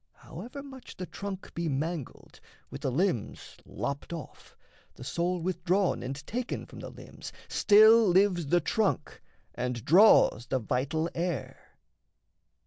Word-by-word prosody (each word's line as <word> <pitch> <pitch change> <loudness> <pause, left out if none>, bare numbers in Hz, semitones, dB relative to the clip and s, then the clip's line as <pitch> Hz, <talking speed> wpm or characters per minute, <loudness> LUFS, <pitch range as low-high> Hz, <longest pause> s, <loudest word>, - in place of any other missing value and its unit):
However 245 - -9
much 265 -2 -12
The 185 - -5
trunk 195 0 -7
be 170 -1 -2
mangled, 150 0 -5 0.3
with - - -8
the 130 - -1
limbs 165 - -2
lopped 140 +3 -5
off, 165 -3 -9 0.4
The - - -10
soul 175 +6 -1
withdrawn 180 +2 0
and 130 +2 -4
taken 245 - -4
from - - -12
the - - -7
limbs, - - -11 0.2
Still 220 +2 +6
lives 180 -3 +3
the 175 +4 +3
trunk 200 -1 -1 0.3
and 125 -2 -4
draws 175 - +5
the - - 0
vital 135 +7 -1
air. 170 -7 -5
175 Hz, 135 wpm, -29 LUFS, 140-200 Hz, 0.4 s, Still